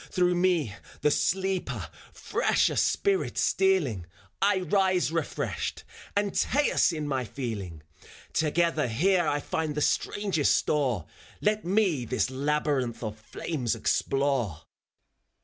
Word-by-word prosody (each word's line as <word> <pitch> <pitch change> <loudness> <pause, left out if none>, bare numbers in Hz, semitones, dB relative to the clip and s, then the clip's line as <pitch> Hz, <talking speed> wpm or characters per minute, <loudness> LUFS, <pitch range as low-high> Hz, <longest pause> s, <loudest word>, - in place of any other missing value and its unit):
Through 180 -1 +2
me, 175 - +1 0.3
the 150 - +3
sleeper, 190 +3 -1 0.2
fresher - - +1
spirit 395 -1 +1
stealing, 155 - +1 0.3
I 195 -1 +3
rise 185 -4 +2
refreshed, 165 -2 -3 0.3
Antaeus 205 +5 +2
in 155 -3 -3
my 135 -3 -1
feeling. 100 - -5 0.5
Together 160 -2 +1
here 175 - +2
I 145 0 +1
find 155 0 -2
the 150 - -1
strangest 190 -3 +1
store; 130 - 0 0.3
Let 210 -1 0
me 180 - +2
this 130 +2 0
labyrinth 140 -3 -1
of 110 -1 -4
flames 120 +2 -3
explore. 120 - 0
150 Hz, 110 wpm, -28 LUFS, 125-185 Hz, 0.5 s, the